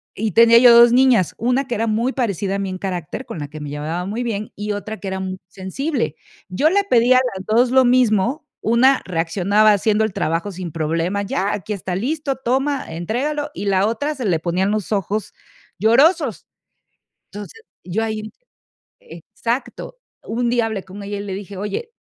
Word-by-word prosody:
Y 215 0 -2
tenía 230 +4 +6
yo 240 0 +8
2 235 0 +8
niñas, 250 -8 +3
una 250 +4 0
que 240 - -2
era 225 +1 -1
muy 230 +4 0
parecida 200 - -1
a - - -2
mí 195 -1 -3
en 185 - -5
carácter, 185 - -5
con 230 -9 -7
la 145 - -5
que 155 - -9
me 150 -1 -6
llevaba 155 +5 -4
muy 220 +5 -3
bien, 215 -3 -4
y 210 0 -4
otra 215 +1 -5
que 200 - -7
era 190 0 -3
muy 185 0 -4
sensible. 195 - -3 0.3
Yo 275 +13 +2
le 400 +4 +2
pedía 250 -7 +4
a - - +5 0.2
las 190 - -8
2 240 +3 +2
lo 260 -1 +5
mismo, 245 +2 +2 0.2
una 250 +4 +3
reaccionaba 190 +5 +2
haciendo 210 +2 +1
el 220 - -2
trabajo 165 +6 -2
sin 180 -2 -6
problema: 165 +5 -1
"Ya, 200 0 -1
aquí 210 +2 -4
está 185 -2 -4
listo, 275 - -2
toma, 270 +3 -1
entrégalo", 275 - -3
y - - -6
la 195 0 +2
otra 285 +7 -2
se 260 -4 -5
le 175 -5 +1
ponían 180 +4 0
los 215 -1 -3
ojos 205 +1 -2 0.4
llorosos. 260 - +3 0.9
Entonces, 210 - -9 0.2
yo 210 +5 -2
ahí 215 -1 -4 0.7
exacto. 275 - -5 0.3
Un 240 +1 -1
día 235 -2 +1
hablé 205 -4 -4
con 190 +2 -10
ella 200 0 -5
y - - -5
le 200 -2 -5
dije: 200 0 -7
"Oye, 210 - -4
215 Hz, 190 wpm, -20 LUFS, 190-245 Hz, 0.9 s, yo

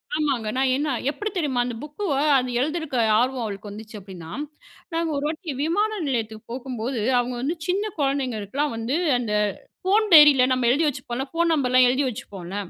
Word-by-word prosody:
ஆமாங்க. 275 -8 0
நான் 265 0 +2
என்ன 295 +2 -1 0.2
எப்படி 415 +8 -4
தெரியுமா? 290 -8 0
அந்த 245 - -4
புக்குவ 300 +3 -3 0.3
அது 255 0 -3
எழுதியிருக்க 310 -1 -2 0.2
ஆர்வம் 255 0 0
அவளுக்கு 205 -1 -6
வந்துச்சு 215 +2 -10
அப்டின்னா, 180 -4 -10 0.6
நாங்க 330 0 0
ஒரு 280 - -3
வாட்டி 320 +1 -4
விமான 405 +8 +1 0.2
நிலையத்துக்கு 225 -4 -3
போகும்போது, 250 -1 -4 0.2
அவுங்க 245 +1 -2
வந்து 295 +7 -1
சின்ன 405 +4 0
குழந்தைங்களுக்கெல்லா 270 -2 -1
வந்து 230 +4 -2 0.2
அந்த 225 -4 -3 0.5
ஃபோன் 415 +4 +3
டைரியில 295 -5 +8
நம்ம 255 -2 +1
எழுதி 300 +6 +2
வச்சுப்போம்ல, 255 -2 -3
ஃபோன் 335 0 +1
நம்பர்லா 255 -3 +3
எழுதி 265 +3 +1
வச்சுப்போம்ல, 195 -5 -8
265 Hz, 160 wpm, -24 LUFS, 235-305 Hz, 0.6 s, டைரியில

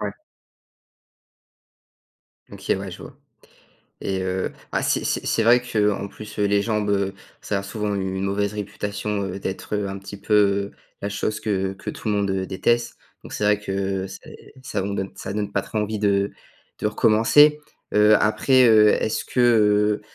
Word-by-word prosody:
Ouais. - - -3 2.4
OK, - - -2
ouais, - - -6
je - - -10
vois. - - -12 0.9
Et 95 -1 -2
heu, 95 0 -2 0.2
bah - - 0
c'est - - 0
c'est - - -1
c'est 115 - +1
vrai 120 +2 +5
qu'en 105 -4 0
plus, 105 +1 -11
heu, 105 - +2
les 100 0 +3
jambes, 105 -2 -1
heu, 100 -1 0 0.3
ça 100 - -2
a 100 - -4
souvent 105 +1 -3
une 95 -1 -2
mauvaise 100 +1 -1
réputation, 105 0 -4
heu, 95 0 -5
d'être, 95 +2 -5
heu, 105 -1 -1
un 95 0 -5
petit 100 +1 -10
peu 100 -1 +2 0.3
la 100 - -1
chose 105 +1 -2
que 95 -3 -1
que 95 - -10
tout - - -6
le 105 - +1
monde 100 -1 0
déteste. 120 +5 0 0.3
Donc - - -10
c'est - - -2
vrai 105 0 +3
que 95 -1 -2
c'est - - -12
ça 120 - -3
on 100 - -3
donne 95 -1 -3
ça 100 - -6
donne 105 0 -2
pas - - -1
trop 110 - -4
envie 105 0 -2
de 100 -1 +1 0.5
de - - -1
recommencer. 115 +8 +5 0.4
Heu, 105 0 +6
après, 130 +4 +4
heu, 110 -1 +7
est-ce 110 - 0
que, 125 - -1
heu, 105 -3 +4
105 Hz, 180 wpm, -23 LUFS, 100-105 Hz, 2.4 s, heu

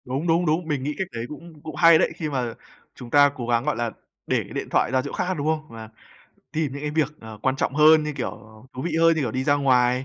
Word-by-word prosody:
Đúng, 135 +7 -3
đúng, 170 +2 +2
đúng, 160 +2 0
mình 145 -4 -2
nghĩ 150 +1 -3
cách 190 - -2
đấy 115 0 -5
cũng 160 0 -11
cũng 155 -1 -8
hay 165 0 +7
đấy. - - +1
Khi 155 -3 -4
mà 125 -5 -2 0.4
chúng 120 - -10
ta 145 +2 +6
cố 120 -2 -5
gắng, 120 0 +1
gọi 150 - 0
là, 120 -1 -2 0.4
để - - +1
cái - - -12
điện - - -4
thoại - - +2
ra 130 - +3
chỗ 140 - -6
khác, 180 +1 -1
đúng 145 +1 -2
không? 155 -1 0
Và 110 -1 -10 0.6
tìm 155 -3 -1
những 140 - -6
cái 150 0 -3
việc, 150 -1 -1
à, 110 - -10
quan 130 +2 +1
trọng 135 - -1
hơn 155 +1 +6
như, 150 0 -3
kiểu, 135 -3 -3
ờ, 110 0 -15
thú 130 - -5
vị 160 -1 -2
hơn 165 0 +5
như, - - 0
kiểu, 125 - -1
đi 130 +3 -2
ra 145 - +3
ngoài, 130 -2 +2
145 Hz, 285 wpm, -24 LUFS, 125-155 Hz, 0.6 s, hay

